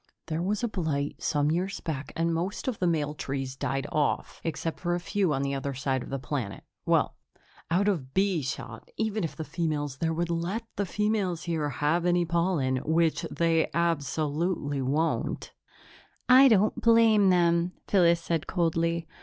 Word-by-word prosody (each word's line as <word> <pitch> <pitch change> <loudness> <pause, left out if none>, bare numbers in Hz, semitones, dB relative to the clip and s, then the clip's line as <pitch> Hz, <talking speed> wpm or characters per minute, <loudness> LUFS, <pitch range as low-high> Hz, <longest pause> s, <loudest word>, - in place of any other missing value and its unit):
"There 160 +1 -2
was 205 +5 -1
a - - +2
blight 155 -8 -2
some 145 0 +1
years 185 +4 -1
back 150 -3 -5
and 165 0 +1
most 175 +8 -3
of 250 -5 -2
the 180 - +1
male 150 -3 0
trees 135 -2 -4
died 135 +1 -2
off, 150 -2 -1
except 165 0 -3
for 175 -1 0
a - - -2
few 190 -1 0
on 135 -1 0
the 140 0 -1
other 140 0 -3
side 130 0 -1
of - - -8
the 135 - -2
planet 130 -6 -4 0.2
well - - +2 0.5
out 185 +5 +2
of 155 -11 -1
bee 190 -4 +2
shot, 130 -1 -6
even 220 -2 -1
if 165 - -3
the 160 - -4
females 150 -5 -2
there 165 +3 0
would 170 +1 -1
let 175 +7 -2
the 200 - -1
females 205 -3 0
here 160 -4 -1
have 160 +5 0
any 175 0 +3
pollen, 170 -6 +1
which 160 +4 +1
they 165 -1 +1
absolutely 155 -2 0
won't." 150 +5 -1 0.8
"I 260 +2 +8
don't 215 -3 +3
blame 225 -3 +5
them," 175 0 +3
Phyllis 170 -3 +4
said 165 -2 -2
coldly. 165 -1 0
165 Hz, 170 wpm, -28 LUFS, 145-180 Hz, 0.8 s, I